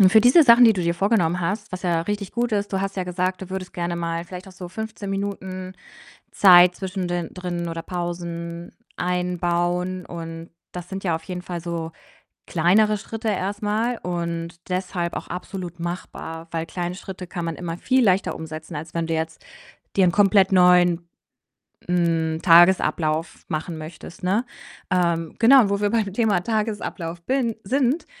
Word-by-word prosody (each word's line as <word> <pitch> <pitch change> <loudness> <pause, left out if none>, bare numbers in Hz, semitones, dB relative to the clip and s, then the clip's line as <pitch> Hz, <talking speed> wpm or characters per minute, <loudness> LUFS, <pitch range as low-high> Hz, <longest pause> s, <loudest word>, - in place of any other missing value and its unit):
Und 185 -1 +7
für 220 0 +7
diese 255 +7 +7
Sachen, 240 -2 +8
die 225 - +7
du 185 - -2
dir 170 0 +1
vorgenommen 180 -3 +1
hast, 205 +5 -2
was 185 +1 -6
ja 170 -2 +1
richtig 205 +1 -4
gut 240 0 0
ist 205 -1 -1
du 190 - 0
hast 195 0 -3
ja 185 - -1
gesagt, 180 +1 -2
du 185 - -9
würdest 190 -1 -5
gerne 175 0 -2
mal 170 0 -3
vielleicht 185 +2 -9
auch - - -13
so 180 -1 -8
15 210 +1 -6
Minuten 190 -2 -4 0.6
Zeit 180 -2 +7
zwischen 190 -1 -4
den 175 -2 -3
drin 175 -2 -4
oder 165 0 -5
Pausen 170 -1 -5 0.3
einbauen, 180 0 -1
und 165 -1 -7 0.2
das 180 -1 -7
sind 195 0 -6
ja 170 -3 +1
auf 165 - -10
jeden 180 +1 -5
Fall 175 -1 -5
so 165 -1 -4 0.6
kleinere 200 +6 +3
Schritte 225 +2 -5
erst 200 +1 -2
mal 225 +3 0
und 170 -1 -3 0.2
deshalb 180 -1 -2
auch - - -6
absolut 180 -1 -6
machbar, 165 -1 -6
weil 165 -1 -2
kleine 175 0 -4
Schritte 185 -1 -8
kann 175 -1 -5
man 165 -1 -3
immer 170 -1 -5
viel 260 +4 +2
leichter 195 -2 +2
umsetzen, 160 +1 -8
als 160 +3 -7
wenn 165 -1 -1
du 165 - -3
jetzt 160 0 -4 0.5
dir 195 - +5
'nen 175 - +3
komplett 195 -1 +4
neuen, 180 -2 +5 0.8
hm, 165 -2 +1
Tagesablauf 170 -2 +4
machen 160 +1 -3
möchtest, 160 +2 -10
ne? 200 +7 +1 0.5
Ähm, 170 -3 +1
genau 260 +3 +8
und 200 - 0
wo 200 0 0
wir 205 - +1
beim 215 -3 0
Thema 210 -3 +2
Tagesablauf 210 -6 -3
bin 245 -1 0
sind, 270 - +1
180 Hz, 175 wpm, -23 LUFS, 170-200 Hz, 0.8 s, Sachen